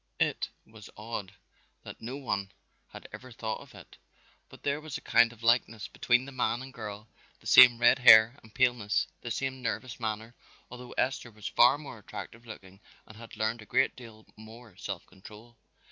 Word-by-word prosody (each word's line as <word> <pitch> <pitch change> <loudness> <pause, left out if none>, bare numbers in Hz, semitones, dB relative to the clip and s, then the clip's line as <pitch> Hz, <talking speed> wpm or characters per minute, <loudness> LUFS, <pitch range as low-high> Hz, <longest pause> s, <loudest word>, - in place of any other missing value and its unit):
It - - 0 0.2
was 110 -2 -14
odd 105 -3 -6 0.5
that - - -11
no 125 +4 -6
one 100 -8 -3 0.4
had - - -12
ever 130 0 -10
thought 110 -2 -5
of - - -16
it, - - -15 0.5
but - - -16
there 145 +1 -1
was 155 -3 -6
a - - -13
kind 115 0 +4
of 115 -1 -17
likeness 115 -4 +1
between 125 +1 +1
the 140 - -9
man 125 -1 -1
and 135 0 -11
girl, 105 -1 -8 0.3
the - - -24
same 120 -1 +8
red 120 +2 +4
hair 120 +1 +7
and 110 - -18
paleness, 120 -4 +1 0.2
the 120 - -6
same 130 +3 -3
nervous 125 0 -4
manner, 110 0 -4 0.4
although 125 0 -10
Esther 130 -2 -1
was 105 -2 -9
far 125 +4 +5
more 145 -6 -10
attractive 115 +3 -10
looking 95 -3 -12 0.3
and 110 - -15
had 115 0 -12
learned 110 +1 -1
a - - -12
great - - +1
deal 115 -3 -13
more 110 -1 -14
self - - -6
control. 105 +5 -15
115 Hz, 185 wpm, -29 LUFS, 110-125 Hz, 0.5 s, same